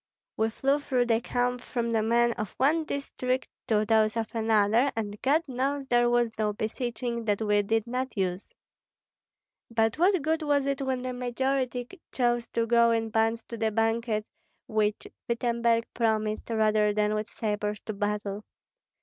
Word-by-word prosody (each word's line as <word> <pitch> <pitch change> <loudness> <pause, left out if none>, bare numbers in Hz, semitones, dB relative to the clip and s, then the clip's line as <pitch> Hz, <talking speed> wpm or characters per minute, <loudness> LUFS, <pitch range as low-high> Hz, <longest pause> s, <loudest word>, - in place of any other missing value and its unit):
We 220 0 +1
flew 275 +5 +1
through 255 -4 +1
the 230 -1 +2
camp 245 0 -1
from 235 -2 -2
the 225 -1 +2
men 235 +2 +3
of 215 -3 -5
one 310 +5 +2
district 260 -3 -2 0.2
to 215 -1 +2
those 215 0 +3
of 225 -1 -3
another, 225 +3 +3
and 210 -2 -4
God 300 +5 +3
knows 270 +2 -1
there 240 -1 +3
was 240 -1 +2
no 210 -1 +1
beseeching 235 +2 -3
that 205 -2 +1
we 210 -2 +2
did 220 +2 0
not 250 0 -3
use. 185 0 -2 1.2
But 225 +3 +1
what 365 -2 +3
good 320 +2 +1
was 290 -2 +1
it 275 0 -1
when 260 -2 -1
the 255 0 -3
majority 250 0 -1 0.2
chose 240 -2 +1
to 230 - -1
go 235 0 +4
in 225 -1 0
bonds 225 +1 +1
to 235 - -5
the 220 0 +1
banquet 225 0 0 0.4
which 215 -1 0 0.2
Wittemberg 235 -1 +1
promised, 215 -2 0
rather 215 -2 +2
than 210 0 +2
with 215 0 -2
sabres 210 -1 -3
to 215 - -5
battle? 205 0 -2
230 Hz, 165 wpm, -28 LUFS, 215-250 Hz, 1.2 s, go